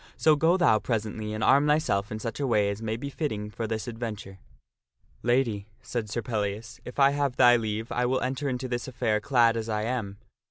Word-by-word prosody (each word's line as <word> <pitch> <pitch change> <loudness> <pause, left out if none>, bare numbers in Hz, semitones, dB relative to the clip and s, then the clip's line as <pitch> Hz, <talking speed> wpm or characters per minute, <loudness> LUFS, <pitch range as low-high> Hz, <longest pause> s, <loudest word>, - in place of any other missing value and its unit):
So 155 -1 +5
go 165 +5 +3
thou 170 -12 +4
presently 110 -2 -3
and 110 0 -3
arm 140 +2 +5
thyself 125 -10 +1
in 110 - -3
such 115 +2 -5
a 140 - 0
way 105 -4 +2
as 100 +2 -6
may 110 0 -2
be 140 +4 -6
fitting 105 -9 -3
for 115 +1 -4
this 110 +2 -3
adventure." 110 -5 -6 0.4
" 60 - -65 0.3
Lady," 120 -5 +1 0.2
said 115 -3 -4
Sir 115 +3 -3
Pellias, 110 +1 -3
" - - -30
if 125 - -9
I 140 -1 +5
have 140 -3 -1
thy 120 -2 +7
leave, 110 -1 -2
I 125 0 +1
will 130 +1 0
enter 135 +2 -2
into 130 0 -3
this 120 0 -3
affair 120 -4 0
clad 120 -5 +3
as 115 0 -3
I 105 -1 -1
am. 110 -4 -3
115 Hz, 225 wpm, -27 LUFS, 110-130 Hz, 0.4 s, thy